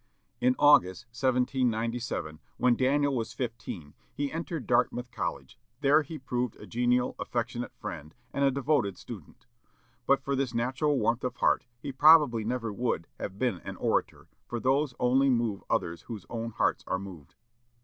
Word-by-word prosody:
'" - - -44
In 130 - +4
August, 140 -12 +5
1797, 120 - -1 0.2
when 125 -1 +4
Daniel 140 +2 +2
was 115 -2 -3
fifteen, 115 - -5 0.2
he 145 -1 -3
entered 165 -4 -4
Dartmouth 125 +1 +1
College; - - -5 0.2
there 145 +3 +5
he 155 +2 -7
proved 125 -3 -2
a - - -12
genial, 125 +1 +1
affectionate 120 +1 -3
friend, 75 +2 -7 0.2
and 140 - 0
a 140 - +5
devoted 135 - 0
student. 100 -8 -11 0.6
But - - +3
for 140 - -1
this 130 -3 -1
natural 130 +5 +1
warmth 115 +1 +1
of 125 -1 -2
heart, - - +2
he 140 - -5
probably 145 -5 +6
never 115 -1 -2
would 115 -7 -1
have 95 -1 -5
been 120 -6 0
an - - -7
orator, - - -1 0.2
for 120 - -3
those 135 +1 +1
only 130 +2 +3
move 115 -5 0
others 85 0 -1
whose 110 -6 -8
own 115 -1 -3
hearts 115 - 0
are - - 0
moved. 90 -7 -10
125 Hz, 160 wpm, -29 LUFS, 115-135 Hz, 0.6 s, probably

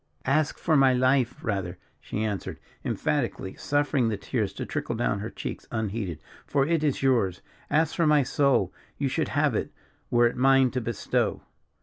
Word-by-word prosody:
"Ask 145 +3 +1
for 160 - +1
my 135 -2 +5
life, 130 -1 +2
rather," 95 -5 -2 0.2
she 110 - -4
answered, 105 -4 -3 0.3
emphatically, 95 - -1
suffering 145 -4 +1
the 105 - -2
tears 100 - -2
to - - -5
trickle 120 - -3
down 110 -3 0
her 110 +3 -4
cheeks - - -6
unheeded, 105 -6 -2 0.3
"for 140 -1 +2
it 165 0 +1
is 145 -2 0
yours; 115 -9 +2 0.3
ask 160 0 +2
for 165 -3 +3
my 150 -2 +5
soul, 140 +1 +2 0.2
you - - 0
should - - 0
have - - +1
it, - - -2 0.4
were 120 0 +4
it 120 - +1
mine 135 0 +4
to 130 - -2
bestow." 115 -2 -1
125 Hz, 175 wpm, -27 LUFS, 110-140 Hz, 0.4 s, my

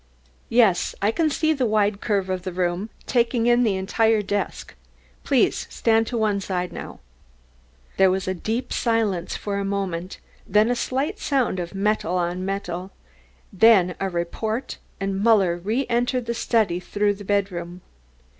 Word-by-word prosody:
"Yes, 220 -7 +3
I 205 +2 +2
can 315 +6 +1
see 315 +2 +1
a - - +2
wide 210 -3 +1
curve 200 -4 0
of 185 -1 -2
the 185 - -5
room, 180 +3 -1 0.2
taking 235 -1 +1
in 240 0 +4
the 215 -5 +2
entire 220 +3 +1
desk. 200 0 -3 0.5
Please - - +1
stand 225 0 +2
to 240 - -3
one 215 -2 +1
side 180 -2 -3
now." - - -8 1.0
There 190 -1 +5
was 190 +1 -1
deep 215 +7 -3
silence 215 -7 0
for 200 -1 -3
a - - -1
moment, 190 -3 -3 0.3
then 210 +4 +3
a - - +1
slight 275 - -2
sound 260 -9 0
as 175 -1 -4
of 195 - -9
metal 200 -3 0
on 175 +1 -1
metal, 190 -2 -4 0.6
then 190 -3 +5
a 195 - -1
report, 215 +7 -3 0.2
and 195 0 -2
Muller 200 -6 +4
re 220 +10 -1
entered 245 +1 0
the 235 - -2
study 220 -6 +1
through 205 +2 0
the 205 0 -10
bedroom. 185 -3 -2
200 Hz, 160 wpm, -23 LUFS, 185-230 Hz, 1.0 s, There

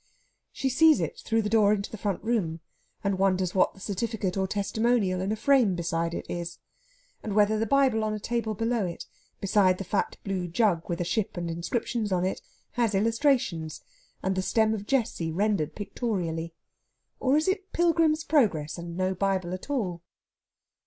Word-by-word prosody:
She 270 - -2
sees 310 +4 +5
it - - -3
through 225 -1 0
the - - -1
door 210 -2 +4
into 200 -1 -3
the 220 - -6
front 200 -3 -2
room, 200 -8 0 0.4
and 200 -2 0
wonders 185 -2 +2
what 185 - +2
the - - -15
certificate 200 -1 -2
or 190 -1 0
testimonial 205 -1 +1
in 190 +2 -1
a - - +1
frame 245 -5 +3
beside 170 0 -1
it - - -5
is; 175 0 -5 0.6
and 210 - -4
whether 215 +1 +4
the 225 - 0
Bible 265 -4 +3
on 215 - 0
the 215 - -3
table 225 0 -2
below 225 +1 0
it, 170 - -6 0.3
beside 190 -2 +3
the 195 - -4
fat 195 +2 -1
blue 190 -3 -2
jug 175 -2 +1
with 170 0 -2
a - - -1
ship 195 +2 -1
and 170 -1 -2
inscriptions 215 +5 -2
on 180 -1 +1
it, 190 - -2 0.3
has 230 -4 0
illustrations 225 - +1 0.4
and 190 - +1
the 190 - 0
Stem 220 +3 +2
of 205 -1 -5
Jesse 230 -11 0
rendered 195 -3 0
pictorially. 175 -7 -3 0.6
Or 270 +2 +3
is 310 - +1
it 385 0 -1
"Pilgrim's 330 -2 +2
Progress," 185 - +1
and 170 0 -7
no 185 0 +1
Bible 185 -2 -1
at 185 +9 -7
all? 190 -12 -2
200 Hz, 180 wpm, -27 LUFS, 180-230 Hz, 0.6 s, sees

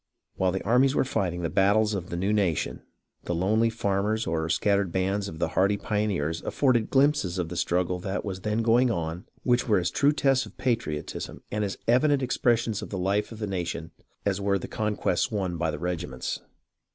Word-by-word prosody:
While 95 -1 +1
the 95 - -3
armies 130 +5 +3
were - - +3
fighting 90 -8 -1
the 85 - 0
battles 105 +2 +3
of 95 -3 -4
the 85 - -3
new 95 +4 +1
nation, 85 -11 0 0.4
the 85 - -1
lonely 110 +6 +2
farmers 105 0 0
or 80 0 0
the 80 - -3
scat 100 +5 +2
tered 95 -4 -2
bands 95 +2 0
of 80 - -7
the - - 0
hardy 100 +2 +2
pioneers 100 -8 -1
afforded 125 -6 +1
glimpses 135 - +2
of 85 -3 -2
the 90 - -6
struggle 90 +1 0
that 95 +3 -3
was 95 -2 -4
then 105 +3 0
going 120 +2 +4
on 85 -4 -3 0.2
which 125 0 +2
were 105 - +4
as 90 -1 0
true 145 +1 +3
tests 135 -5 +2
of - - -16
patriotism 115 - -3
and 105 0 -1
as 100 -1 -3
evident 135 +3 +3
expressions 120 -3 +1
of - - -7
the 100 - -4
life 100 +4 0
of 110 - -8
the 110 - -3
nation 85 -4 -4 0.3
as 100 -1 0
were 100 0 +2
the 95 - -6
conquests 105 -2 0
won 95 -6 -2
by 85 -1 -1
the 75 - -3
regiments. 80 -6 -3
100 Hz, 205 wpm, -27 LUFS, 90-115 Hz, 0.4 s, going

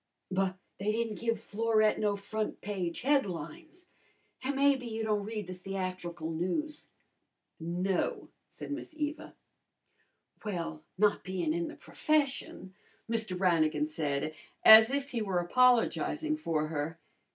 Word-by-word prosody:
"But 190 0 0 0.2
they 205 +2 0
didn't 225 -2 -2
give 230 -2 0
Florette 215 0 +2
no 205 -1 +1
front 215 +2 -4
page 185 -5 -3
headlines, 285 - -2 0.6
an' 275 +2 -1
maybe 275 -2 +3
you 225 -1 -3
don't 210 -2 0
read 215 -2 -4
the 185 - -6
theatrical 180 -3 -4
news." 185 - -3 0.7
"No," 175 +3 -1 0.2
said - - -8
Miss 300 +2 -6
Eva. 300 +1 -4 1.1
"Well, 170 -7 -4
not 210 +1 +3
bein' 180 -4 -1
in 170 0 -1
the - - -8
profession," 280 - -1 0.3
Mr. 225 -5 -2
Brannigan 160 -5 +2
said 155 -1 -2 0.3
as 220 +1 +11
if 280 +1 -2
he 235 - -1
were 195 -4 -1
apologizing 250 - +3
for 165 - -1
her. 160 +1 -3
205 Hz, 130 wpm, -31 LUFS, 175-245 Hz, 1.1 s, as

